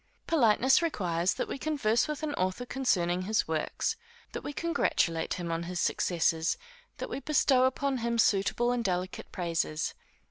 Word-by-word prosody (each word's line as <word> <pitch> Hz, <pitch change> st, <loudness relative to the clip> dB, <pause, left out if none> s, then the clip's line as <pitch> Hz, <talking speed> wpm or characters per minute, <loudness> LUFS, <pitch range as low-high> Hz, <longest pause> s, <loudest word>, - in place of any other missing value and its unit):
Politeness 260 Hz, -2 st, +4 dB
requires 180 Hz, -, 0 dB
that -, -, -2 dB
we -, -, -5 dB
converse 255 Hz, -6 st, +1 dB
with 300 Hz, 0 st, -4 dB
an 300 Hz, -2 st, -1 dB
author 185 Hz, +5 st, -1 dB
concerning 185 Hz, -10 st, 0 dB
his 215 Hz, +4 st, 0 dB
works; 160 Hz, -1 st, -1 dB, 0.3 s
that -, -, -5 dB
we -, -, -5 dB
congratulate 280 Hz, -, 0 dB
him 170 Hz, -2 st, -4 dB
on 165 Hz, 0 st, -1 dB
his 180 Hz, -1 st, -3 dB
success; 165 Hz, -, +1 dB, 0.4 s
that -, -, -4 dB
we -, -, -4 dB
bestow 275 Hz, -3 st, +3 dB
upon 265 Hz, 0 st, 0 dB
him 235 Hz, 0 st, -1 dB
suitable 230 Hz, +2 st, +2 dB
and 245 Hz, -1 st, 0 dB
delicate 185 Hz, -2 st, -3 dB
praises. 165 Hz, -3 st, -1 dB
215 Hz, 155 wpm, -29 LUFS, 175-265 Hz, 0.4 s, Politeness